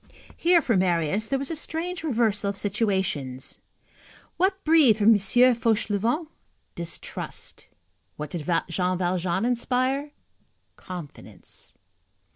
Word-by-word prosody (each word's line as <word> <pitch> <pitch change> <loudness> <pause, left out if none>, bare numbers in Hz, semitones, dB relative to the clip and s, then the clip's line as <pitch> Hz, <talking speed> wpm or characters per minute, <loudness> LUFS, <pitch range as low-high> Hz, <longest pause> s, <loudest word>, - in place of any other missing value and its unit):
Here, 340 -1 +3
for 230 - +1
Marius, 180 +2 +1
there 270 - 0
was 275 +4 -3
a - - -2
strange 335 +3 -1
reversal 220 -8 +1
of 200 - -4
situations. 190 - -1 0.8
What 380 +1 +1
breathed 305 -9 +5
from 210 0 +4
M. 215 - +5
Fauchelevent? 230 - +2 0.5
distrust. 170 0 -4 0.5
What 150 -1 -6
did 170 -1 -5 0.2
Jean 180 +1 0
Valjean 180 +2 0
inspire? 255 +3 0 0.7
confidence. 175 -6 -10
215 Hz, 105 wpm, -25 LUFS, 180-265 Hz, 0.8 s, breathed